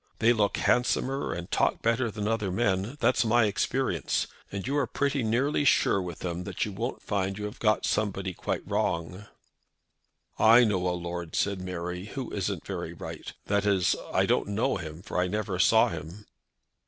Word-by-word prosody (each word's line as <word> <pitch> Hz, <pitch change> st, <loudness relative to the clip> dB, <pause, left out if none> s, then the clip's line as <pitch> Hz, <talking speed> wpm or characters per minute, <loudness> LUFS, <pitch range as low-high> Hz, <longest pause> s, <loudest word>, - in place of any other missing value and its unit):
They 115 Hz, +1 st, +4 dB
look 105 Hz, -3 st, +1 dB
handsomer 130 Hz, +2 st, +1 dB
and 85 Hz, 0 st, -6 dB
talk -, -, +1 dB
better 115 Hz, +1 st, +2 dB
than 105 Hz, -1 st, -4 dB
other 105 Hz, -4 st, 0 dB
men. 100 Hz, +4 st, 0 dB
That's 130 Hz, -, +3 dB
my 120 Hz, 0 st, +4 dB
experience. 105 Hz, -, 0 dB, 0.3 s
And 100 Hz, -1 st, -4 dB
you 135 Hz, +3 st, -1 dB
are 140 Hz, -4 st, +1 dB
pretty 140 Hz, +2 st, 0 dB
nearly 130 Hz, +7 st, +1 dB
sure 130 Hz, -7 st, +3 dB
with 90 Hz, -2 st, -7 dB
them 90 Hz, 0 st, -3 dB
that 100 Hz, -3 st, -2 dB
you 105 Hz, -, -5 dB
won't 115 Hz, +6 st, -4 dB
find 95 Hz, -1 st, -1 dB
you 105 Hz, -, -4 dB
have 105 Hz, -, -7 dB
got 110 Hz, -1 st, +2 dB
somebody 95 Hz, -3 st, -1 dB
quite -, -, -4 dB
wrong." 90 Hz, +5 st, -2 dB, 1.1 s
"I 115 Hz, +3 st, +7 dB
know 95 Hz, -5 st, +1 dB
a 90 Hz, 0 st, 0 dB
lord," 85 Hz, -1 st, -5 dB
said 100 Hz, -2 st, 0 dB
Mary, 90 Hz, 0 st, -4 dB
"who 130 Hz, +3 st, -6 dB
isn't 100 Hz, -3 st, -3 dB
very -, -, -4 dB
right. -, -, -7 dB
That 100 Hz, 0 st, +1 dB
is, 95 Hz, -3 st, +3 dB, 0.2 s
I -, -, +3 dB
don't -, -, +1 dB
know 110 Hz, +6 st, 0 dB
him, 80 Hz, 0 st, -8 dB
for 90 Hz, -, -3 dB
I 90 Hz, -, +2 dB
never 100 Hz, -1 st, -2 dB
saw 110 Hz, +4 st, +5 dB
him." 85 Hz, +5 st, -8 dB
100 Hz, 180 wpm, -28 LUFS, 90-115 Hz, 1.1 s, I